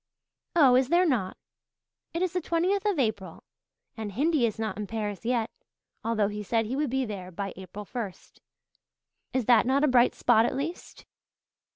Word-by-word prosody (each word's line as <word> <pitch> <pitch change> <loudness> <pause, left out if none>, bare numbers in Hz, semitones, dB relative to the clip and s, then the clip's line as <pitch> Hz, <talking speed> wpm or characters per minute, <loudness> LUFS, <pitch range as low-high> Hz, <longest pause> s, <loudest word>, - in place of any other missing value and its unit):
"Oh, 275 -7 +6
is 255 0 +3
there 350 +2 +4
not? 225 - 0 0.8
It 340 - 0
is 370 -1 -1
the 360 - 0
twentieth 375 +6 0
of 405 -5 +1
April, 205 - -2 0.5
and 220 -3 -5
Hindy 280 - +2
is 220 - -5
not 220 -3 -3
in 210 -1 -5
Paris 210 -1 -4
yet, 235 -2 0 0.5
although 220 -3 +1
he 210 0 -5
said 225 +2 0
he 240 +5 -3
would 295 0 0
be 265 +1 0
there 195 -5 -6
by 195 +2 -5
April 190 +3 -9
first. 210 -5 -7 0.9
Is 260 -3 -1
that 240 0 +5
not 275 +2 +2
a - - +5
bright 250 -2 +4
spot 230 -1 +4
at - - -3
least?" 305 +6 -6
235 Hz, 180 wpm, -27 LUFS, 210-280 Hz, 0.9 s, Oh